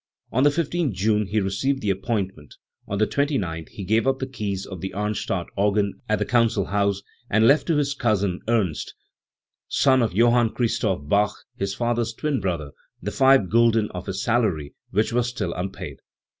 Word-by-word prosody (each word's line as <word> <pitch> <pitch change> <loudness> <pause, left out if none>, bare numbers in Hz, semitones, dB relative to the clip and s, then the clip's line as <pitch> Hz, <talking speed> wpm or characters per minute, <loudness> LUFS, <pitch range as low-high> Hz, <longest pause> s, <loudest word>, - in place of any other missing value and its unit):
On 130 - +1
the 145 - +6
15 170 +2 0
th 105 -8 -4
June 105 0 +2
he 110 +2 +1
received 105 +8 -1
the 100 - +2
appointment; 95 - -3 0.3
on 100 - -2
the 110 - +3
29th 105 - -1
he 100 - -8
gave 110 +6 +1
up 135 0 +2
the 130 - -3
keys 105 -7 -4
of 95 -3 -8
the 95 0 -5
Arnstadt 105 -3 -2
organ 100 0 +1 0.2
at 110 - +3
the - - -1
council 115 -5 +2
house, 100 0 0 0.3
and 110 +2 +4
left 140 +3 +4
to 165 - +2
his 140 -1 +1
cousin 100 -8 0
Ernst, 105 -9 0 0.7
son 130 -2 +3
of 115 -6 0
Johann 120 +1 +3
Christoph 105 - 0
Bach, 105 +5 +2 0.2
his 100 0 -3
father's 120 -1 -1
twin 150 -1 -1
brother, 85 -6 -3 0.3
the 105 - -4
five 135 -7 +4
gulden 115 -1 +3
of 90 +1 -7
his 95 +1 -3
salary 105 -12 0 0.2
which 105 +4 0
were 125 - +3
still 115 -8 -3
unpaid*. 90 -5 -5
105 Hz, 185 wpm, -24 LUFS, 95-120 Hz, 0.7 s, the